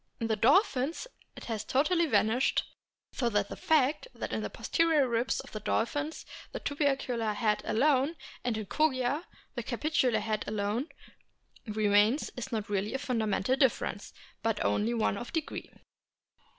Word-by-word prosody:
In 230 - -1
the 225 -1 +1
dolphins 275 - +3 0.3
it - - -10
has 220 -2 -3
totally 325 +8 +2
vanished, 245 -2 +2 0.5
so 240 - 0
that 205 -2 0
the - - -5
fact 305 - +2
that - - -5
in - - -1
the - - -3
posterior 325 -5 +2
ribs 235 +1 0
of - - -14
the 215 - -5
dolphins 290 +9 -1 0.3
the - - -3
tubercular 270 -6 0
head 210 0 +1
alone, 275 +5 +2 0.3
and 240 -3 0
in 215 - -4
Kogia 275 - +1 0.3
the - - -3
capitular 260 -7 +1
head 215 0 -2
alone, 215 +7 -1 0.8
remains 210 +4 +3
is 245 - -5 0.2
really 205 0 -1
not - - -4
a - - +2
fundamental 225 -3 0
difference, 255 -6 0 0.3
but 225 -1 0
only 225 +3 +1
one 215 -3 +1
of 240 - -7
degree. 320 -3 -4
245 Hz, 150 wpm, -30 LUFS, 215-285 Hz, 0.8 s, dolphins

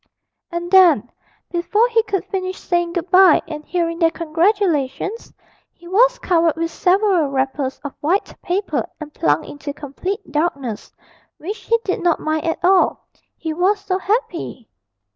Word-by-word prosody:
And 345 +1 -4
then, 340 - +5 0.4
before 410 +6 +2
he 460 -1 +3
could 400 -4 -3
finish 370 -1 -4
saying 345 -1 -1
good 350 0 -4
bye 370 -3 +7
and 300 -1 -7
hearing 335 0 -2
their 330 -2 +4
congratulations, 340 - -1 0.4
he 345 - -16
was - - +4
covered 335 -3 +2
with 330 0 -2
several 370 -2 +2
wrappers 270 0 -2
of 285 - -6
white 355 +7 0
paper 360 -4 -1 0.2
and 300 -1 -9
plunged 150 +1 +1
into 290 0 -7
complete 295 +5 -5
darkness, 280 -8 -2 0.5
which 405 +8 -6
he 460 - +3
did 380 - -1
not 345 -2 +2
mind 310 0 -2
at 325 - 0
all, 375 0 +3 0.3
he 320 -1 -4
was 375 +5 +2
so 385 -1 -2
happy. 380 - -2
345 Hz, 150 wpm, -20 LUFS, 305-385 Hz, 0.5 s, bye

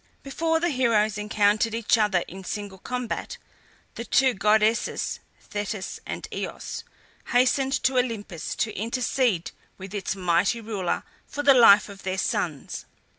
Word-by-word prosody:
Before 325 +4 0
the 345 +1 +1
heroes 220 -6 +2
encountered 210 +1 +2
each 230 0 +3
other 210 -5 +2
in 190 +1 -9
single 200 -1 -5
combat, 250 +2 -4 0.6
the 235 - -5
two 260 +1 +3
goddesses, 215 +2 +1 0.2
Thetis 205 -1 -5
and - - -5
Eos, - - -5 0.4
hastened 260 +2 +2
to 260 -1 +3
Olympus 205 -9 -3
to 215 -1 -1
intercede 230 -3 0 0.3
with 190 +1 -9
its 200 -2 -2
mighty 180 +4 +1
ruler 210 -5 -2 0.2
for 290 - -4
the 280 -1 +7
life 215 -5 +7
of 200 -1 -11
their 185 0 -3
sons. 160 -5 -2
215 Hz, 135 wpm, -25 LUFS, 195-250 Hz, 0.6 s, the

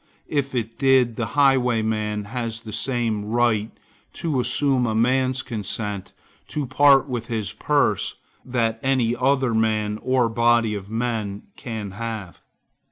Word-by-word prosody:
If 140 -3 -1
it 115 -1 -3
did, 130 -4 +4
the 115 -1 -2
highwayman 110 -6 +2
has 115 0 -4
the 110 -2 -9
same 115 -5 -1
right 110 -1 +1 0.4
to 160 -6 -1
assume 125 +1 +1
a 110 - -1
man's 130 +3 +2
consent 105 -4 -4 0.4
to 150 -2 -3
part 135 +1 +5
with 120 -3 -4
his 110 -3 -3
purse, - - +1 0.3
that 115 -3 -1
any 130 -3 +1
other 130 -2 +1
man, 110 -1 0
or 130 -2 +2
body 115 -1 +2
of 100 -1 -6
men, 110 -3 -2
can 110 -6 -6
have. 110 -3 -6
115 Hz, 135 wpm, -23 LUFS, 110-130 Hz, 0.4 s, part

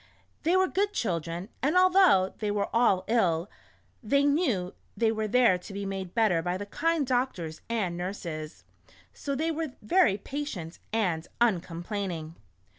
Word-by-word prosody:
They 340 +4 +3
were 375 0 +4
good 405 +2 0
children, 170 - -2
and 300 +7 +2
although 365 - +5
they 210 - -1
were 205 +1 -1
all 230 -6 +4
ill, 185 -6 +1 0.5
they 280 +5 +2
knew 280 - +1 0.2
they 225 +1 +3
were 220 -1 -2
there 230 -5 +4
to 195 - -10
be 200 0 -4
made 190 -1 -5
better 215 -8 +3
by 180 +2 -2
the 205 - -5
kind 325 +7 0
doctors 245 -11 -2
and 205 -7 -1
nurses, 170 -4 -5 0.5
so 280 -1 -4
they 320 +4 0
were 315 -4 -3
very 215 - +3
patient 210 - -6
and 180 -7 0
uncomplaining. 175 -5 -1
210 Hz, 150 wpm, -28 LUFS, 180-275 Hz, 0.5 s, although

